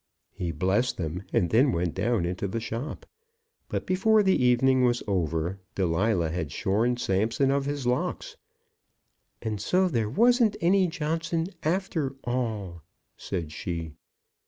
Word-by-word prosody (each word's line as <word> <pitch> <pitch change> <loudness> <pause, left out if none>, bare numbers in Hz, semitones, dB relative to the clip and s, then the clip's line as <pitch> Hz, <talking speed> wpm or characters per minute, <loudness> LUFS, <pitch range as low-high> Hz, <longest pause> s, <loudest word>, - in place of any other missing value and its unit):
He 90 -4 -4
blessed 95 +10 0
them, 85 +1 -3
and 100 -8 +1
then 130 +5 +4
went 85 -3 -1
down 105 -1 0
into 90 +3 -2
the 115 +4 -3
shop. 115 +6 -5 0.6
But - - -3
before 210 +3 +3
the 190 -9 +3
evening 130 +1 +4
was 120 -1 +2
over, 85 -1 -1 0.2
Delilah 90 -1 +1
had 80 -4 -3
shorn 110 +9 +1
Samson 115 +6 +1
of 140 0 +1
his 145 -2 -3
locks. 125 +1 -1 1.1
"And 110 -2 -3
so 185 +1 +2
there 115 -10 0
wasn't 235 - +4
any 185 +2 +3
Johnson 165 +1 -2
after 160 -5 -1
all," 110 -9 -3 0.3
said 85 -5 -4
she. 80 -1 -5
115 Hz, 135 wpm, -27 LUFS, 90-150 Hz, 1.1 s, then